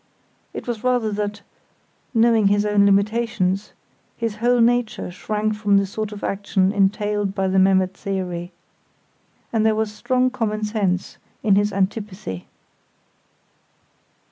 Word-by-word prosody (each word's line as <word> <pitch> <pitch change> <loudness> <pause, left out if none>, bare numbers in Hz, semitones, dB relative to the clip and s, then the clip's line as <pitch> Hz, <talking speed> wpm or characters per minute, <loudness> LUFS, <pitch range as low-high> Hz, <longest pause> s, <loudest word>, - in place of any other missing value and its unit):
It - - -7
was 235 -2 -4
rather 245 -4 +1
that, 205 0 -3 0.7
knowing 225 -3 +4
his 205 +1 +2
own 205 -1 +3
limitations, 200 -1 +1 0.4
his 225 -3 -3
whole 240 +2 +2
nature 235 -4 +1
shrank 215 +3 -2
from 210 -1 +2
the 200 - +2
sort 215 +2 -4
of 205 -1 -9
action 195 -1 0
entailed 205 0 0
by 195 -1 0
the 190 0 +2
Memmert 190 0 +3
theory. 180 -3 -4 1.0
And 220 -1 +2
there 220 -1 +3
was 215 -1 -1
strong 255 +3 +1
common 215 -3 -2
sense 200 -4 -1 0.2
in 210 - +4
his 205 +1 +3
antipathy. 195 - -3
210 Hz, 130 wpm, -22 LUFS, 195-220 Hz, 1.0 s, knowing